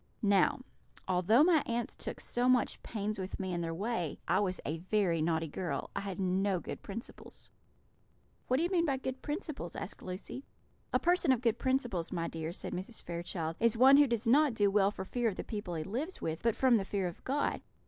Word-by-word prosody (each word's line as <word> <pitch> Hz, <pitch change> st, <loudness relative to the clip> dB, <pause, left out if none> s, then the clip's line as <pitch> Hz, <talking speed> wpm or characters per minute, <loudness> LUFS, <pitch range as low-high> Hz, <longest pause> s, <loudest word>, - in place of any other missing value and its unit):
"Now, 205 Hz, +7 st, +3 dB, 0.5 s
although 190 Hz, -, +4 dB
my 330 Hz, -3 st, +5 dB
aunts 235 Hz, 0 st, -2 dB
took -, -, -6 dB
so 245 Hz, +1 st, 0 dB
much 255 Hz, -1 st, +2 dB
pains 210 Hz, -1 st, -3 dB
with 190 Hz, 0 st, -5 dB
me 190 Hz, -2 st, -2 dB
in 175 Hz, -, -1 dB
their 165 Hz, -1 st, -2 dB
way, 180 Hz, -2 st, -2 dB
I -, -, +3 dB
was 185 Hz, -3 st, 0 dB
a 160 Hz, +3 st, -2 dB
very 185 Hz, -2 st, +1 dB
naughty 160 Hz, 0 st, +1 dB
girl; 175 Hz, +4 st, -4 dB
I -, -, 0 dB
had 195 Hz, -2 st, -5 dB
no 190 Hz, 0 st, +1 dB
good -, -, -7 dB
principles." 225 Hz, +4 st, -9 dB, 1.0 s
"What 255 Hz, -, +2 dB
do 315 Hz, -, +1 dB
you 350 Hz, -, 0 dB
mean 340 Hz, -3 st, +2 dB
by 270 Hz, -2 st, +1 dB
good 260 Hz, 0 st, -5 dB
principles?" 295 Hz, -, -4 dB
asked -, -, -6 dB
Lucy. 185 Hz, +8 st, -6 dB, 0.5 s
"A -, -, +4 dB
person 350 Hz, -4 st, +3 dB
of 250 Hz, -3 st, +2 dB
good 230 Hz, -2 st, +1 dB
principles, 245 Hz, -10 st, 0 dB
my 170 Hz, -2 st, -1 dB
dear," 160 Hz, 0 st, -4 dB
said -, -, -6 dB
Mrs. 190 Hz, +6 st, -6 dB
Fairchild, 170 Hz, -1 st, -4 dB
"is 230 Hz, -1 st, +3 dB
one 265 Hz, +3 st, +8 dB
who 290 Hz, 0 st, +6 dB
does 235 Hz, -1 st, -1 dB
not 280 Hz, +1 st, +5 dB
do 205 Hz, -2 st, +3 dB
well 200 Hz, -1 st, +4 dB
for 190 Hz, -2 st, -6 dB
fear 240 Hz, +3 st, 0 dB
of 195 Hz, -, -5 dB
the -, -, -4 dB
people 205 Hz, -6 st, -5 dB
he 155 Hz, -, -2 dB
lives 265 Hz, -, -4 dB
with, 160 Hz, 0 st, -3 dB
but 230 Hz, -2 st, +2 dB
from 255 Hz, -3 st, +4 dB
the 200 Hz, -, -1 dB
fear 195 Hz, -1 st, -2 dB
of 175 Hz, -1 st, -6 dB
God. 285 Hz, +2 st, 0 dB
205 Hz, 215 wpm, -32 LUFS, 180-255 Hz, 1.0 s, one